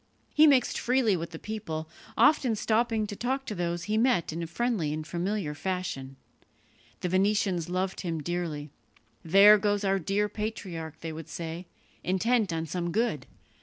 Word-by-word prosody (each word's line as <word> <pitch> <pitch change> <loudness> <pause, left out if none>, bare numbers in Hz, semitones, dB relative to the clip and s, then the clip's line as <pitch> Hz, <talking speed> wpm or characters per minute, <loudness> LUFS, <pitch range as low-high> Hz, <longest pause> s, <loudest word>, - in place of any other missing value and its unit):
He 310 +1 +7
mixed 265 -4 +3
freely 245 -5 +2
with 170 -1 -4
the 165 - -8
people, 165 -7 -5 0.3
often 260 -7 +4
stopping 220 +1 +1
to 205 0 -6
talk 265 +5 -2
to 215 - -4
those 175 -2 -2
he 215 +4 0
met 235 -10 +2
in 170 +1 -3
friendly 195 -4 -1
and 155 0 -4
familiar 175 -1 -2
fashion. 150 -5 -4 0.9
The 180 - -1
Venetians 190 -2 +1
loved 185 +1 -2
him 170 -3 -2
dearly. 155 -3 -3 0.5
"There 200 +5 +7
goes 205 0 +1
our 195 0 +2
dear 200 +4 0
patriarch," 190 -7 -5
they 165 -1 -5
would 160 0 -8
say, 165 +3 -6 0.4
"intent 210 +2 +1
on 165 0 -2
some 175 +2 -3
good. 215 - -1
185 Hz, 160 wpm, -28 LUFS, 165-215 Hz, 0.9 s, He